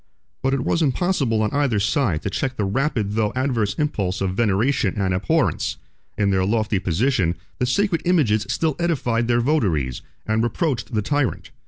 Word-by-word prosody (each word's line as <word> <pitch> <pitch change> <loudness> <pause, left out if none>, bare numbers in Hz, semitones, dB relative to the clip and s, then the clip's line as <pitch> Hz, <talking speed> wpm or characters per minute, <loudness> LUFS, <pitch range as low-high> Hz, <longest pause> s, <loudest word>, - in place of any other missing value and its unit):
But 135 +1 +1
it 135 - -1
was 170 - +1
impossible 135 -7 +1
on 105 - 0
either 140 -7 +1
side 100 - 0
to 100 - -2
check 130 +6 -2
the 105 - 0
rapid 110 -2 -1
through 105 -1 0
adverse 120 -6 0
impulse 100 -12 -1
of 95 -1 -1
veneration 110 +1 +1
and 95 -2 +1
abhorrence: 90 -1 0 0.4
in 100 -1 +2
their 95 -1 +2
lofty 110 0 +1
position, 90 - +1 0.2
the 125 - +1
sacred 180 +4 +1
images 115 - +2
still 160 -3 0
edified 125 -9 0
their 120 0 +2
votaries, 90 - 0 0.2
and 110 +1 +1
reproached 120 0 -1
the 105 - +1
tyrant. 145 +2 -1
115 Hz, 170 wpm, -22 LUFS, 100-140 Hz, 0.4 s, in